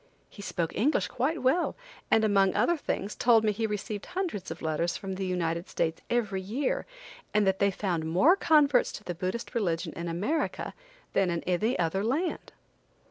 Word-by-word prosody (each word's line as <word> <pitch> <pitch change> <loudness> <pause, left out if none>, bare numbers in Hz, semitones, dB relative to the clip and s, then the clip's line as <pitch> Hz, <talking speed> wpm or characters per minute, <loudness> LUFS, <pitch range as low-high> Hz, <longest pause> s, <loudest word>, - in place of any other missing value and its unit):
He 205 - -10
spoke 170 -4 -3
English 270 +10 +2
quite 265 +5 -1
well, 315 +7 +2 0.3
and 220 - +4
among 195 -3 +3
other 345 - +3
things 210 - -3
told 230 -2 +4
me 215 - +3
he 220 +2 -1
received 210 0 -4
hundreds 360 - -3
of - - -7
letters 160 +2 0
from 195 -2 -5
the 190 0 -3
United 170 -1 -1
States 165 0 -1
every 210 -5 0
year, 240 +9 -2 0.5
and 210 -1 +4
that 190 0 +2
they 200 - +4
found 180 -4 -2
more 190 - +5
converts 295 -8 +4
to - - -8
the 180 - -4
Buddhist 185 +7 -4
religion 175 -8 -1
in 170 0 -4
America 200 - -2 0.4
than 195 -2 +2
in 170 -1 -2
any 195 +7 +1
other 180 +3 0
land. 295 +11 -1
200 Hz, 180 wpm, -28 LUFS, 180-245 Hz, 0.5 s, more